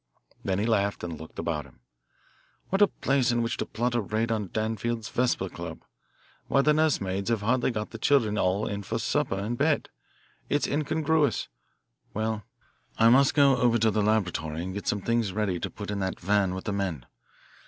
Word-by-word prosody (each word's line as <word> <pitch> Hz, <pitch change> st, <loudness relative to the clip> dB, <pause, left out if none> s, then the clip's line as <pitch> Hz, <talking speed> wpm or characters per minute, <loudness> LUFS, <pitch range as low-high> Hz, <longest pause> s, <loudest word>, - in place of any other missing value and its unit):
Then 95 Hz, -1 st, 0 dB
he 105 Hz, -, 0 dB
laughed, 100 Hz, -3 st, +1 dB
as 85 Hz, -, -3 dB
he -, -, -5 dB
looked 80 Hz, +1 st, -11 dB
about 75 Hz, -3 st, -2 dB
him. -, -, -22 dB, 0.9 s
"What 195 Hz, +2 st, +1 dB
a 205 Hz, -, +8 dB
place 135 Hz, -7 st, +1 dB
in 120 Hz, 0 st, +1 dB
which 115 Hz, -, -2 dB
to -, -, -3 dB
plot 120 Hz, +2 st, -1 dB
a 120 Hz, -, +1 dB
raid 110 Hz, +3 st, -1 dB
on 105 Hz, -3 st, -1 dB
Danfield's 110 Hz, +2 st, -2 dB
Vesper 120 Hz, -6 st, 0 dB
Club! 85 Hz, -2 st, -8 dB, 0.6 s
Why, 140 Hz, -, +3 dB
the 150 Hz, -, +4 dB
nurse 155 Hz, -1 st, +3 dB
maids 95 Hz, +2 st, -2 dB
have 115 Hz, -3 st, 0 dB
hardly 125 Hz, +4 st, +2 dB
got 105 Hz, -3 st, -4 dB
the 115 Hz, -, -8 dB
children 115 Hz, -6 st, +3 dB
all 95 Hz, +1 st, +1 dB
in 100 Hz, 0 st, -3 dB
for 110 Hz, +3 st, -3 dB
supper 140 Hz, -1 st, 0 dB
and 105 Hz, +5 st, -3 dB
bed. 150 Hz, +1 st, +1 dB, 0.6 s
It's 145 Hz, -, +2 dB
incongruous. 150 Hz, -1 st, +1 dB, 0.7 s
Well, 110 Hz, 0 st, -1 dB, 0.6 s
I 115 Hz, +1 st, +6 dB
must 135 Hz, +3 st, +5 dB
go 140 Hz, -2 st, +6 dB
over 120 Hz, -1 st, +3 dB
to 110 Hz, -1 st, +3 dB
the 105 Hz, -, +1 dB
laboratory 90 Hz, -7 st, 0 dB
and 95 Hz, +1 st, -5 dB
get 100 Hz, -, -6 dB
some 105 Hz, -, 0 dB
things 115 Hz, -3 st, 0 dB
ready 100 Hz, -4 st, -1 dB
to -, -, -3 dB
put 105 Hz, -1 st, -7 dB
in 100 Hz, -, -2 dB
that 95 Hz, -1 st, -2 dB
van 95 Hz, 0 st, +1 dB
with 95 Hz, -, -6 dB
the 105 Hz, -, -1 dB
men. 90 Hz, -10 st, -2 dB
110 Hz, 200 wpm, -27 LUFS, 100-120 Hz, 0.9 s, a